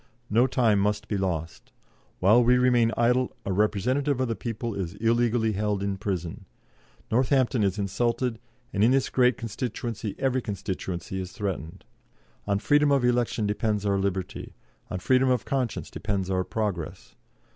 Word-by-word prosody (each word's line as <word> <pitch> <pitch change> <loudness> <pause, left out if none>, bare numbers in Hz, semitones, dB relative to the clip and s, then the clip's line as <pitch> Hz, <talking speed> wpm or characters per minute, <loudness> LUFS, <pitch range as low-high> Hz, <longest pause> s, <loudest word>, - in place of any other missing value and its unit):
No 120 +4 +4
time 115 -6 +2
must 105 +2 0
be 105 - -2
lost. 85 -4 -3 0.5
While 110 +6 +5
we 125 +1 +5
remain 120 -2 +3
idle, 125 +2 +2
a 95 - -1
representative 125 +8 +1
of 130 - +1
the 115 - -1
people 115 0 -4
is 90 -4 -4
illegally 115 0 +2
held 105 -1 -1
in 100 -1 -2
prison. 90 -5 -4 0.7
Northampton 130 -1 +2
is 100 0 +1
insulted, 115 +4 -1 0.3
and 100 - +2
in 115 - +6
this 135 0 +2
great 125 -1 +3
constituency 115 -1 -4
every 130 -1 0
constituency 95 -3 -4
is 95 0 -7
threatened. 95 -3 -5 0.6
On 100 -1 +2
freedom 145 +6 +3
of 135 -3 +3
election 120 -3 +1
depends 105 0 -1
our 100 -1 +2
liberty; 95 -2 -3 0.3
on - - -3
freedom 130 +7 +3
of 125 -3 +1
conscience 130 -4 -2
depends 100 -2 -2
our 95 0 +1
progress. 95 -5 -4
110 Hz, 155 wpm, -26 LUFS, 100-125 Hz, 0.7 s, in